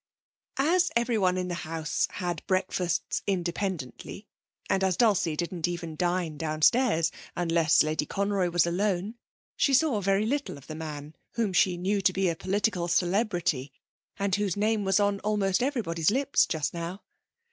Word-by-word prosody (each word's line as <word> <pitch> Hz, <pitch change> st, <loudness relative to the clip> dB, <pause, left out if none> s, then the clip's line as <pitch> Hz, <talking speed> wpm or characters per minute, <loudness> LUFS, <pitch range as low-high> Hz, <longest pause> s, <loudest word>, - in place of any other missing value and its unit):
As 350 Hz, +6 st, +3 dB
everyone 220 Hz, -6 st, +2 dB
in 180 Hz, 0 st, -2 dB
the 180 Hz, -, -3 dB
house 160 Hz, -1 st, -2 dB
had 175 Hz, -3 st, -3 dB
breakfasts 185 Hz, -2 st, -1 dB
independently, 180 Hz, -, -3 dB, 0.4 s
and 190 Hz, -, +1 dB
as 185 Hz, -2 st, +1 dB
Dulcie 200 Hz, -9 st, +2 dB
didn't 175 Hz, +1 st, -2 dB
even 170 Hz, -2 st, -5 dB
dine 175 Hz, -2 st, -1 dB
downstairs 165 Hz, +3 st, +2 dB, 0.2 s
unless 165 Hz, -3 st, +3 dB
Lady 155 Hz, -1 st, -1 dB
Conroy 200 Hz, -2 st, 0 dB
was 175 Hz, -1 st, +3 dB
alone, 190 Hz, +3 st, -1 dB, 0.4 s
she 275 Hz, -, +3 dB
saw 265 Hz, -7 st, +2 dB
very 195 Hz, +2 st, +2 dB
little 280 Hz, -, -2 dB
of 140 Hz, -, -14 dB
the 155 Hz, -, -7 dB
man 155 Hz, -1 st, -7 dB, 0.2 s
whom 220 Hz, -5 st, -1 dB
she 180 Hz, 0 st, +3 dB
knew 195 Hz, +3 st, 0 dB
to 185 Hz, 0 st, +3 dB
be 190 Hz, -1 st, +1 dB
a 165 Hz, -, -1 dB
political 190 Hz, -1 st, 0 dB
celebrity, 175 Hz, -, 0 dB, 0.5 s
and 200 Hz, -1 st, -1 dB
whose 205 Hz, -3 st, -1 dB
name 215 Hz, 0 st, +1 dB
was 195 Hz, +1 st, +3 dB
on 200 Hz, -1 st, +1 dB
almost 200 Hz, -2 st, 0 dB
everybody's 205 Hz, -, 0 dB
lips 275 Hz, +5 st, +2 dB
just 155 Hz, -3 st, -2 dB
now. 170 Hz, +4 st, -5 dB
185 Hz, 155 wpm, -27 LUFS, 170-205 Hz, 0.5 s, As